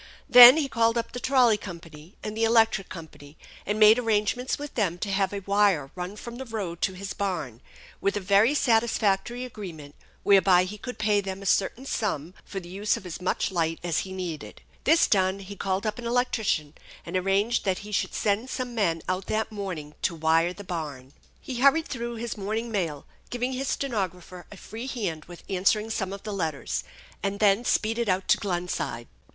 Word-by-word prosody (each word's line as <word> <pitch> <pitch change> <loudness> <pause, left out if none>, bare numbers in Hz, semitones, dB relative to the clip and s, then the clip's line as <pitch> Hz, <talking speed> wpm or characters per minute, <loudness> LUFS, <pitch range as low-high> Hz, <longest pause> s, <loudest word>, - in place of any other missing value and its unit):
Then 245 +3 +11
he 300 -3 +1
called 230 -2 +2
up 230 - -2
the 245 - -5
trolley 250 -5 +4
company 165 -2 -11
and 210 0 -5
the 225 - -1
electric 225 -3 +3
company, 155 -3 -11 0.3
and 210 +2 -1
made 215 +2 +7
arrangements 230 +2 0
with 290 -1 -7
them 190 -7 0
to 200 +3 -3
have 195 -1 +1
a 200 -1 -4
wire 200 -9 +2
run 180 +2 -6
from 235 +2 -8
the 265 - -6
road 200 -8 -5
to 190 - +1
his 195 +1 -6
barn, 160 - -3 0.4
with 200 +1 +1
a - - 0
very 200 +8 +3
satisfactory 230 -1 +1
agreement 170 -11 -9 0.3
whereby 190 -2 +5
he 205 +3 -6
could 250 +3 -7
pay 210 -1 +2
them 195 0 -6
a - - -9
certain 200 +7 +1
sum 180 - -2
for 195 - -6
the 175 - -12
use 200 +4 -1
of - - -11
as 180 0 -7
much 185 - -1
light 165 -2 0
as 170 -2 0
he 190 - -5
needed. 175 -5 -6 0.2
This 325 +3 +5
done, 190 -1 +2
he 200 +1 -9
called 195 +2 -2
up 215 +3 -2
an 235 - -5
electrician, 225 - 0 0.3
and - - -6
arranged 195 +5 +1
that 190 -2 +1
he 210 - -9
should - - -1
send 215 +4 0
some 255 -2 -4
men 170 -8 0
out 185 +1 -2
that 220 0 -1
morning 180 -8 -5
to 170 - 0
wire 165 +2 +2
the 205 +3 -10
barn. 145 -7 -6 0.3
He 255 - -6
hurried 280 +5 +4
through 235 -2 -4
his 235 +1 -4
morning 220 +3 -3
mail, 165 -9 -2 0.2
giving 245 +1 -2
his 265 +1 -3
ste - - -1
nographer 180 -4 -4
a 205 - -10
free 225 +6 -8
hand 190 -12 -4
with 175 0 -12
answering 205 +3 +1
some 190 -3 -2
of 200 0 -7
the 210 - -5
letters, 160 -7 -2 0.4
and 200 0 -2
then 205 +2 +4
speeded 225 -1 0
out 185 +1 0
to - - +6
Glenside. 175 - -3
200 Hz, 200 wpm, -26 LUFS, 180-225 Hz, 0.4 s, Then